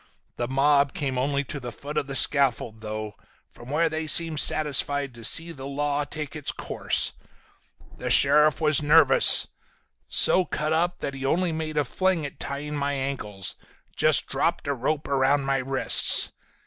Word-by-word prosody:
The 120 - -3
mob 140 +1 +1
came 135 -3 -3
only 140 +2 -1
to 145 +1 -6
the 120 -2 -8
foot 145 +5 -9
of 140 - -2
the 135 - -5
scaffold 125 -6 +1
though, 110 -1 -6 0.4
from 120 - -14
where 160 +4 +1
they 160 0 -4
seemed 160 0 +4
satisfied 145 -3 +1
to 115 -1 -13
see 165 +8 +3
the 135 -4 -9
law 145 +1 -2
take 150 +1 -7
its 150 -3 -3
course. - - -1 0.9
The - - -4
sheriff 150 +1 +5
was 155 -2 +2
nervous. 150 -2 +5 0.6
So 185 - +3
cut 155 -2 -3
up 175 +2 -1
that 140 - -4
he 135 0 -8
only 170 +5 0
made 160 -1 -5
a 145 - +1
fling 185 +2 -1
at 140 - -10
tying 145 +2 -5
my 145 0 -2
ankles, 130 -8 -5 0.4
just - - +1
dropped - - -2
a 140 - 0
rope 150 +4 -3
around 140 +1 +1
my 135 0 -1
wrists. 135 0 +3
145 Hz, 170 wpm, -24 LUFS, 135-155 Hz, 0.9 s, sheriff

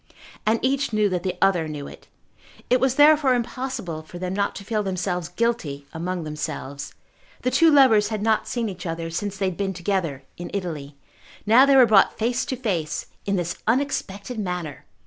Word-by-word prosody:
And 220 +1 +4
each 275 +1 +1
knew 210 -1 +2
that 180 -2 -1
the 185 -1 -3
other 175 -5 +3
knew 150 -2 -6
it. - - -13 0.6
It 250 - +5
was 265 0 +2
therefore 290 -3 +6
impossible 235 -9 -4
for 160 +3 -11
them 180 +1 -3
not 200 +1 -1
to - - -7
feel 215 +1 -1
themselves 185 -3 -2
guilty 180 -10 -2
among 175 +1 -3
themselves. 150 -2 -5 0.5
The 255 - +1
two 320 +6 +5
lovers 260 -8 +6
had 215 -1 -3
not 220 -1 +1
seen 235 -2 -2
each 185 -2 -6
other 165 0 -4
since 200 +4 -3
they 195 - -1
had 180 - -8
been 195 -1 -1
together 170 -6 -2
in 175 - -6
Italy. 150 -7 -5 0.5
Now 240 +6 +6
they 275 - +5
were 260 -2 +8
brought 210 -4 +4
face 240 +2 0
to 260 - -3
face 180 -11 -2 0.2
in 200 - +1
this 175 -1 -2
unexpected 230 -3 -1
manner! 180 -7 -4
195 Hz, 185 wpm, -24 LUFS, 170-235 Hz, 0.6 s, were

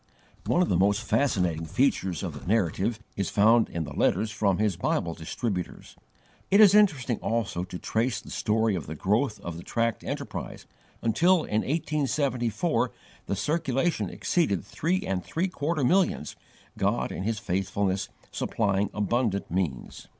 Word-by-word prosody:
One 180 - +3
of - - -2
the - - +2
most 100 +4 +2
fascinating 90 - +1
features 95 - +1
of - - -3
the - - -10
Narrative 105 +2 +1 0.2
is 100 -2 -1
found 110 +3 +4
in 85 - -3
the - - -7
letters 110 -1 +1
from 100 -3 +1
his 105 -3 +1
Bible 85 0 -1
distributors. 90 +4 -4 0.5
It 200 - +5
is 205 -3 +8
interesting 145 - +3
also 110 -6 -1
to 90 -1 -7
trace 115 +6 -1
the - - -12
story 110 0 +1
of 85 -7 -4
the 80 - -5
growth 105 - 0
of 85 -1 -6
the 85 - -8
tract 115 -1 -1
enterprise, - - -5 0.4
until, 165 - +3
in 105 +1 0
1874, 140 -3 0 0.4
the - - 0
circulation 150 - 0
exceeded 125 - 0
three 180 - -1
and 95 -2 -2
three 170 - -1
quarter 155 -3 -2
millions, 180 +7 +2 0.4
God - - 0
in - - -5
His 110 +3 -1
faithfulness 95 -1 -1 0.2
supplying 100 0 0
abundant 105 -2 0
means. 85 -9 -3
110 Hz, 150 wpm, -27 LUFS, 95-140 Hz, 0.5 s, is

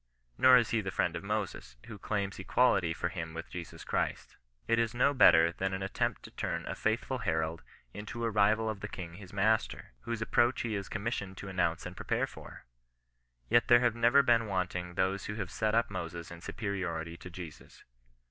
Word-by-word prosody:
Nor 130 - +7
is 120 -3 +1
he 115 - +2
the 95 - -4
friend 85 -2 0
of 85 - -4
Moses, 100 - -3
who 110 -3 -9
claims 100 -1 -2
equality 95 -4 +3
for 85 +2 -2
him 80 -2 -6
with 85 - -7
Jesus 85 -2 -7
Christ. - - -2 0.3
It 115 0 +3
is 115 0 0
no 140 +4 +3
better 85 -10 +6
than 95 +2 -2
an 95 - -4
at 95 - -5
tempt - - -1
to - - -11
turn - - -3
a - - -3
faithful 120 +4 -1
herald 80 -5 -1 0.3
into 105 +3 -6
a 115 - 0
rival 105 +2 +3
of 110 -2 -3
the 105 - -5
king 90 -5 -7
his 95 +1 -11
master, 105 - 0
whose 115 -1 -4
approach 120 +2 +2
he 115 -2 -2
is 100 -2 -4
commissioned 100 -3 -3
to 100 - -7
an 95 - -8
nounce 85 -2 +1
and 90 +1 -7
prepare - - 0
for. - - -12 0.8
Yet 120 - +4
there 120 -1 +7
have 120 -2 +3
never 120 +4 +5
been 115 -3 +3
wanting 90 -2 -2
those 95 +1 0
who 105 - -4
have 100 -5 -4
set 110 -1 0
up 115 -2 +2
Moses 85 -3 -5
in 85 0 -9
superiority 90 -7 -4
to 90 - -10
Jesus. 85 -3 -10
100 Hz, 205 wpm, -31 LUFS, 85-115 Hz, 0.8 s, Nor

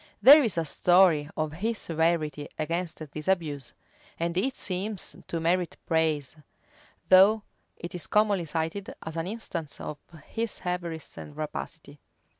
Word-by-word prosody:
There 290 +3 +10
is 225 -10 -1
a 165 - +1
story 170 -1 +4
of 155 -1 -1
his 220 +7 -2
severity 160 -4 0
against 170 +2 -2
this 150 0 -7
abuse; 150 -9 -1 0.4
and 170 +1 -1
it 255 +9 0
seems 190 +2 -3
to 165 - -2
merit 175 +2 0
praise, 160 -4 0 0.7
though 200 +4 +7 0.3
it 170 - -7
is 180 - -3
commonly 210 -4 +2
cited 165 +5 -3
as 160 - -6
an 165 +1 -2
instance 175 -8 -5
of 150 - -6 0.3
his 230 -1 -3
avarice 175 -3 -4
and 145 0 -10
rapacity. 150 -1 -6
170 Hz, 140 wpm, -27 LUFS, 155-190 Hz, 0.7 s, There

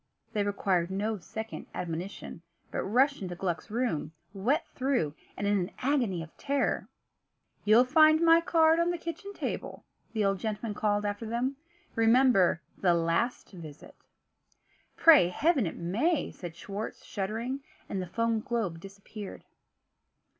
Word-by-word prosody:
They 210 -2 +1
required 195 -4 0
no 205 +2 -2
second 220 +5 -7
admonition, 175 +1 -5 0.3
but - - -2
rushed 265 +6 +2
into 180 -2 -4
Gluck's 175 -1 -3
room, 210 -10 -1 0.2
wet 235 +10 +1
through, 255 - 0 0.2
and 205 - -2
in 205 0 +2
an 180 +1 -3
agony 245 - 0
of 160 - -14
terror. 280 -1 -1 0.8
"You'll 220 +4 +6
find 310 +3 +6
my 330 0 +6
card 325 -1 +4
on 340 +1 +2
the 350 - -1
kitchen 335 +4 -6
table," - - -5 0.3
the 215 -2 +1
old 195 -1 +1
gentleman 215 0 -3
called 205 0 0
after 205 +2 -3
them. 245 +4 -1 0.4
"Remember 225 -6 +4 0.2
the 175 -3 +3
last 170 +9 0
visit." 155 -6 -11 1.0
"Pray 310 - +7
Heaven 280 - +2
it - - -5
may!" 240 - 0
said 175 -3 -8
Schwartz, 200 +4 -6
shuddering. 225 +7 -3 0.3
And 190 - -3
the 180 - -5
foam 230 +4 0
globe 215 -8 -2
disappeared. 200 +2 -9
215 Hz, 140 wpm, -29 LUFS, 185-260 Hz, 1.0 s, Pray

